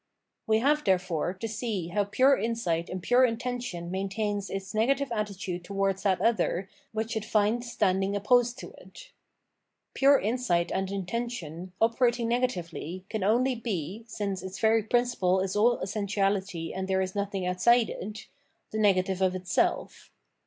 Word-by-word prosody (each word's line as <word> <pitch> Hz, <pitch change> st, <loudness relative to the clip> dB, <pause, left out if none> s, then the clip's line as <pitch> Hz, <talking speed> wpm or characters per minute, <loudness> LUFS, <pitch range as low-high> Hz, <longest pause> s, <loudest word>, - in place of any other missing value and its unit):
We 220 Hz, 0 st, +4 dB
have, 300 Hz, +3 st, +2 dB
therefore, 180 Hz, -3 st, +1 dB
to 225 Hz, +4 st, -4 dB
see 210 Hz, -6 st, -3 dB
how 205 Hz, +3 st, 0 dB
pure 260 Hz, +7 st, +4 dB
insight 220 Hz, -9 st, -1 dB
and 185 Hz, -1 st, -5 dB
pure 245 Hz, +4 st, +4 dB
intention 240 Hz, -7 st, -2 dB
maintains 200 Hz, +1 st, -2 dB
its 195 Hz, +1 st, -5 dB
negative 270 Hz, +5 st, +1 dB
attitude 200 Hz, -5 st, -3 dB
towards 195 Hz, 0 st, -1 dB
that 190 Hz, -2 st, +2 dB
other 195 Hz, -4 st, +1 dB, 0.2 s
which 220 Hz, +1 st, -3 dB
it 220 Hz, -, -1 dB
finds 225 Hz, +2 st, +1 dB
standing 195 Hz, 0 st, +1 dB
opposed 240 Hz, +4 st, +3 dB
to -, -, -9 dB
it. -, -, -14 dB, 0.8 s
Pure 275 Hz, 0 st, +5 dB
insight 210 Hz, -7 st, 0 dB
and 190 Hz, 0 st, -1 dB
intention, 190 Hz, -4 st, -4 dB
operating 235 Hz, +1 st, +2 dB
negatively, 185 Hz, -7 st, -2 dB
can 220 Hz, -3 st, -2 dB
only 245 Hz, +6 st, +3 dB
be, 215 Hz, -3 st, -4 dB
— -, -, -33 dB
since 200 Hz, -4 st, -3 dB
its 190 Hz, +1 st, -7 dB
very 225 Hz, 0 st, +3 dB
principle 220 Hz, -5 st, +1 dB
is 190 Hz, +1 st, -2 dB
all 235 Hz, +3 st, +3 dB
essentiality 195 Hz, -4 st, -1 dB
and 190 Hz, 0 st, -3 dB
there 190 Hz, 0 st, +1 dB
is 185 Hz, 0 st, -4 dB
nothing 200 Hz, -2 st, -2 dB
outside 225 Hz, +7 st, +4 dB
it 210 Hz, +3 st, -7 dB, 0.2 s
— -, -, -46 dB
the 220 Hz, -, -2 dB
negative 190 Hz, -2 st, +2 dB
of 185 Hz, -1 st, +2 dB
itself. 180 Hz, -1 st, -1 dB
205 Hz, 155 wpm, -28 LUFS, 185-235 Hz, 0.8 s, Pure